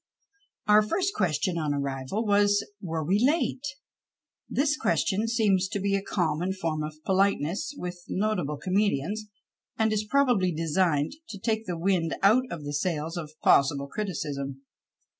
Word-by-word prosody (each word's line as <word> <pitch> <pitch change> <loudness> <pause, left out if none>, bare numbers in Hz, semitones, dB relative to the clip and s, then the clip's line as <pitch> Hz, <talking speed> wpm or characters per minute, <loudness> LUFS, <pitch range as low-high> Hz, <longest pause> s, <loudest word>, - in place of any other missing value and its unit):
Our 210 0 +7
first 370 - 0
question 170 -1 0
on 150 -2 0
arrival 140 - -2
was, 205 0 +3 0.2
were 165 -3 -3
we 190 +6 +2
late? 290 -1 +2 0.9
This 290 +2 +1
question 215 -6 +1
seems 205 -5 +2
to 200 - -3
be 200 +1 0
a 195 - +2
common 175 -1 -1
form 165 -5 -2
of 155 0 -5
polite 195 +1 +3
ness 185 - -3
with 175 0 -6
notable 185 -8 -1
comedians, 200 +2 0 0.5
and 220 -1 +2
is 215 0 0
probably 230 -6 +2
designed 160 -2 +1 0.2
to 200 - -6
take 220 +2 -2
the 175 -2 -2
wind 170 -2 +1
out 225 +6 +5
of 165 -3 -6
the 145 0 -5
sails 160 +1 -1
of 155 -3 -7
possible 140 0 +4
criticism. 140 -7 -4
185 Hz, 150 wpm, -27 LUFS, 155-210 Hz, 0.9 s, Our